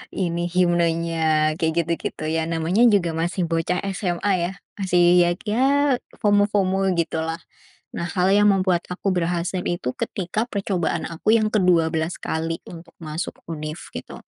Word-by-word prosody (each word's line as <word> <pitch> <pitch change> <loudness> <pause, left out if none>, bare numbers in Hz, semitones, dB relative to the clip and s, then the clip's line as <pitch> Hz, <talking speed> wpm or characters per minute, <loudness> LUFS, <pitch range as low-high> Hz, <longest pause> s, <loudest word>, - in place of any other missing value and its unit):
ini, 175 -2 -1
himnenya, 165 -3 +2
kayak 160 +1 +1
gitu 170 - -3 0.2
gitu. - - -10
Ya, 160 0 -1
namanya 165 +6 0
juga 185 -5 +2
masih 175 +2 -1
bocah 165 +2 0 0.2
SMA 185 +1 -1 0.2
ya, - - -6 0.3
masih 180 -2 +2 0.2
ya 175 0 +3
ya 230 +5 +1 0.6
FOMO-FOMO 205 -2 +2
gitulah. 165 0 -1 0.6
Nah, 170 - -3
hal 185 -1 +1
yang 205 0 +5
membuat 185 -3 +1
aku 185 +2 -4
berhasil 175 +1 -1
itu 130 -8 -3
ketika 195 +4 -2
percobaan 190 -7 -1
aku 165 +6 -1
yang 220 -1 +4
ke-12 170 -5 +1
kali 165 +1 -3
untuk 170 -1 -11
masuk 155 +2 -4 0.2
univ, 155 0 -5 0.2
gitu. - - -8
175 Hz, 145 wpm, -23 LUFS, 165-190 Hz, 0.6 s, yang